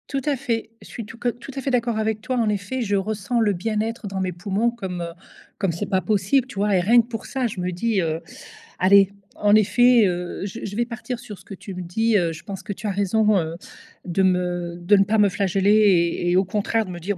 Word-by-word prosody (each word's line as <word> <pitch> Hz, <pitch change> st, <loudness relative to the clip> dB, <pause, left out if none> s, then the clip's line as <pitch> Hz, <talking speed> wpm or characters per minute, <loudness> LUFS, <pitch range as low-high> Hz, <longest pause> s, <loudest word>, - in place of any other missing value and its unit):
Tout 275 Hz, -1 st, -2 dB
à 295 Hz, -2 st, +1 dB
fait, 235 Hz, -4 st, -3 dB
je -, -, -13 dB
suis 230 Hz, -, -7 dB
tout 230 Hz, +2 st, -11 dB
que 240 Hz, +1 st, 0 dB
tout 245 Hz, +3 st, -8 dB
à 270 Hz, -, -3 dB
fait 270 Hz, -, -2 dB
d'accord 235 Hz, -2 st, 0 dB
avec 220 Hz, 0 st, -1 dB
toi 255 Hz, +3 st, -2 dB
en 230 Hz, -3 st, +2 dB
effet, 210 Hz, +5 st, -2 dB
je 205 Hz, -3 st, 0 dB
ressens 215 Hz, +4 st, -1 dB
le 215 Hz, -3 st, +2 dB
bien-être 215 Hz, +3 st, -2 dB
dans 195 Hz, -1 st, -4 dB
mes 185 Hz, -1 st, -2 dB
poumons 200 Hz, +6 st, 0 dB
comme, 190 Hz, -7 st, -5 dB
heu, 170 Hz, 0 st, -5 dB, 0.4 s
comme 195 Hz, -4 st, 0 dB
c'est 170 Hz, +5 st, -4 dB
pas 190 Hz, -2 st, 0 dB
possible, 215 Hz, +6 st, +1 dB
tu 255 Hz, -, -11 dB
vois? 200 Hz, 0 st, +1 dB
Et -, -, +4 dB
rien 235 Hz, +6 st, +5 dB
que 230 Hz, -, -13 dB
pour 225 Hz, -3 st, -6 dB
ça 260 Hz, -2 st, -1 dB
je 200 Hz, -4 st, -6 dB
me 180 Hz, 0 st, -2 dB
dis, 200 Hz, +3 st, 0 dB
heu: 160 Hz, -1 st, -2 dB, 0.6 s
«Allez 195 Hz, +1 st, +5 dB, 0.3 s
en 205 Hz, 0 st, +3 dB
effet, 235 Hz, +2 st, +5 dB
heu, 180 Hz, +1 st, -3 dB
je 205 Hz, +4 st, -7 dB
je 200 Hz, -, -5 dB
vais 240 Hz, -, +1 dB
partir 240 Hz, +1 st, -6 dB
sur 230 Hz, -5 st, -9 dB
ce -, -, -17 dB
que -, -, -9 dB
tu 195 Hz, 0 st, -9 dB
me 180 Hz, -, -5 dB
dis». 220 Hz, +6 st, +1 dB
Heu, 170 Hz, -3 st, +1 dB
je 160 Hz, 0 st, -9 dB
pense 195 Hz, -2 st, -7 dB
que -, -, -6 dB
tu 210 Hz, +3 st, -6 dB
as -, -, 0 dB
raison, 205 Hz, +2 st, +2 dB
heu, 165 Hz, -1 st, -2 dB, 0.5 s
de 185 Hz, +2 st, 0 dB
me 180 Hz, -2 st, 0 dB
de 175 Hz, +4 st, +4 dB
ne 195 Hz, -, +5 dB
pas 215 Hz, +3 st, 0 dB
me 205 Hz, -1 st, +5 dB
flageller 195 Hz, +1 st, +1 dB
et 180 Hz, -5 st, +3 dB
et -, -, +2 dB
au 190 Hz, -, +3 dB
contraire 215 Hz, +3 st, 0 dB
de 185 Hz, -, -8 dB
me 175 Hz, -, -7 dB
dire: 190 Hz, +3 st, -3 dB
205 Hz, 260 wpm, -23 LUFS, 185-225 Hz, 0.6 s, rien